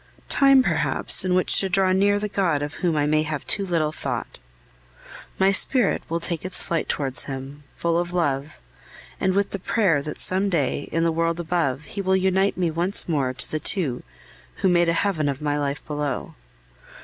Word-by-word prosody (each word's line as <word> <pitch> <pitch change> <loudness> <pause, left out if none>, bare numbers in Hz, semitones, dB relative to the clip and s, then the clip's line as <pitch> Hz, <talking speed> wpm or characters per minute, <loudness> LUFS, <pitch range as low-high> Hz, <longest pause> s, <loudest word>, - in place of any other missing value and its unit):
Time, 275 -2 +5
perhaps, - - +1
in 185 -1 +1
which 185 - +4
to 195 - +2
draw 190 0 +2
near 200 +2 +3
the 210 +1 -2
God 180 -8 0
of 145 +1 -5
whom 175 -4 +1
I 145 -1 +1
may 155 +1 +2
have 155 -2 -4
too 200 - 0
little 165 -5 0
thought. - - -5 1.0
My 190 +1 +4
spirit 235 +3 +2
will 165 +1 -1
take 170 -1 -4
its 185 0 -3
flight 165 -1 -2
towards 135 -2 -2
Him, 135 +1 -7
full 170 0 0
of 175 0 -3
love, 145 - -2 0.6
and 190 0 +1
with 200 0 +1
the 200 - -4
prayer 185 -6 +1
that 150 +1 -7
some 190 +2 0
day, 145 -5 -1
in 165 +1 0
the 165 - +2
world 165 +1 -1
above, 160 -5 -1
He 200 +6 -5
will 190 0 +2
unite 190 +1 +1
me 175 -3 0
once 175 +5 0
more 140 -6 0
to 130 0 -4
the 155 - -1
two 150 -8 +1 0.6
who 190 - +5
made 175 -1 +3
a - - +2
heaven 165 -5 0
of 140 -1 -3
my 150 -1 -1
life 140 0 -3
below. 145 -3 -3
170 Hz, 195 wpm, -23 LUFS, 150-190 Hz, 1.0 s, Time